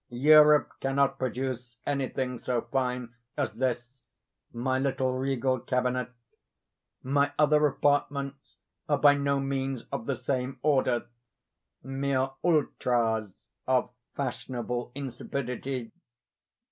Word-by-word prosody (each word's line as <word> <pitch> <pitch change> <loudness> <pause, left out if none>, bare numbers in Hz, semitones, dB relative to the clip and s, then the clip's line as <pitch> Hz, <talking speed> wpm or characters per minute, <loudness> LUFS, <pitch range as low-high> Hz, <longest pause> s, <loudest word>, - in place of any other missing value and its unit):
Europe 150 +4 +6
cannot 135 0 +1
produce 125 -1 -3
anything 130 -3 -2
so 125 -1 -1
fine 125 -2 -1 0.2
as - - 0
this, 120 0 -2 0.6
my 130 +2 -1
little 130 -1 0
regal 130 -1 0
cabinet. 125 +1 -1 0.9
My 140 +2 +2
other 150 0 +5
apartments 140 -1 -1 0.3
are 145 - +3
by 145 0 +7
no 140 -1 +1
means 135 -2 -2
of - - -4
the 140 - 0
same 130 0 -2
order—mere 130 0 -2
ultras 120 - +1 0.3
of 130 -1 +2 0.2
fashionable 125 -2 -3
insipidity. 130 -2 -4
130 Hz, 95 wpm, -28 LUFS, 125-140 Hz, 0.9 s, by